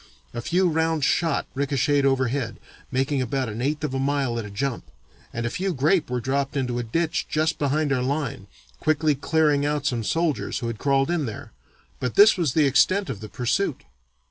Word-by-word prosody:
A 120 - -4
few 180 +8 +2
round 160 -2 0
shot 165 +3 +1
ricochetted 140 +1 +1
overhead, 130 -2 0 0.3
making 135 +1 0
about 130 0 -1
an 110 +2 -5
eighth 150 +4 -1
of 150 -3 -2
a 135 - -1
mile 135 -3 0
at 110 - -5
a - - -7
jump, 120 +5 -3 0.5
and 120 +1 -3
a - - 0
few 185 +2 -2
grape 150 +4 +2
were 125 0 -1
dropped 135 +3 -1
into 125 -3 -1
a - - -2
ditch 160 +8 -1
just 155 +1 0
behind 145 0 +1
our 130 - 0
line, 135 -6 -2 0.3
quickly 155 0 +2
clearing 150 0 +2
out 145 0 -1
some 120 -3 0
soldiers 165 +5 -1
who 120 - -4
had 115 -2 -4
crawled 140 +2 +2
in 160 -6 0
there, 110 - -8 0.5
but 125 -2 -3
this 210 +2 +7
was 165 -9 0
the 155 - +4
extent 185 +8 +3
of 100 - -7
the 110 - -8
pursuit. 130 - -1
140 Hz, 195 wpm, -24 LUFS, 125-155 Hz, 0.5 s, this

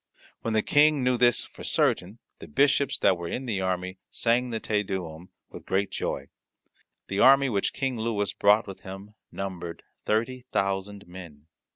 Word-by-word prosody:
When 115 -1 -2
the 110 - +2
King 150 -1 +4
knew 125 0 +3
this 120 -1 +3
for - - -13
certain, 95 +5 +1 0.2
the - - -10
bishops 140 - +2
that 90 -2 +3
were 85 - -5
in 130 +9 -4
the 105 -6 -2
army 95 0 -2
sang 120 +2 +1
the 115 -2 -3
Te 105 -2 0
Deum 90 -4 -6 0.2
with - - -11
great 100 +1 0
joy. 70 0 -3 0.8
The 95 - -2
army 135 +1 +6
which 100 -4 0
King 130 -4 -2
Louis 105 -4 -1
brought 105 +2 +4
with 95 -2 -9
him 95 +2 -10 0.2
numbered 90 -4 -6 0.2
thirty 120 +4 -1
thousand 100 +1 -2
men. 85 -5 -12
100 Hz, 170 wpm, -27 LUFS, 95-120 Hz, 0.8 s, army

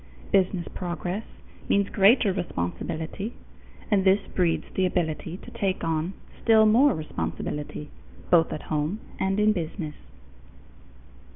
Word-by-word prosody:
Business 185 -2 +2
progress 180 +3 -3 0.5
means 200 0 +3
greater 200 +1 +5
responsibility, 160 - -4 0.6
and 200 -2 +4
this 195 +1 +4
breeds 175 -3 +1
the 185 -1 +2
ability 165 -1 -2
to - - -12
take 195 -2 -1
on 165 +2 -1 0.3
still 220 -1 +6
more 235 +4 +5
responsibility, 150 -1 -4 0.4
both 165 -2 +5
at 155 - -5
home 155 +7 -1 0.2
and 195 +1 +1
in 215 0 +4
business. 165 -3 -4
185 Hz, 115 wpm, -26 LUFS, 160-200 Hz, 0.6 s, still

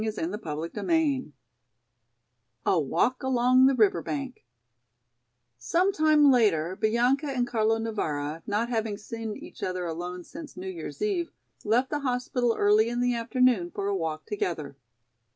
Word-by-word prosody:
CHAPTER 170 -6 -4
XIII 280 - 0 1.3
A 180 - +3
Walk 225 - 0
Along 255 0 +4
the 270 - +3
River 205 -7 +3
Bank 275 - -5 1.2
SOME 360 - +1
time 305 -3 +5
later 185 -8 +2
Bianca 240 +7 +1
and 255 -3 0
Carlo 225 -2 +1
Navara, 160 -9 -3
not 210 +3 0
having 220 -3 -1
seen 225 0 -6
each - - -12
other 185 -1 -2
alone 175 +2 -5
since 300 - -10
New 190 +1 -5
Year's 180 - -6
eve, 375 -5 0 0.3
left 240 +5 +1
the 295 - 0
hospital 250 -3 0
early 210 +2 +4
in 240 0 -2
the 245 0 +2
afternoon 235 -5 +2
for 195 - -5
a 200 - 0
walk 160 -3 -3
together. 160 -8 -3
225 Hz, 140 wpm, -27 LUFS, 185-255 Hz, 1.3 s, time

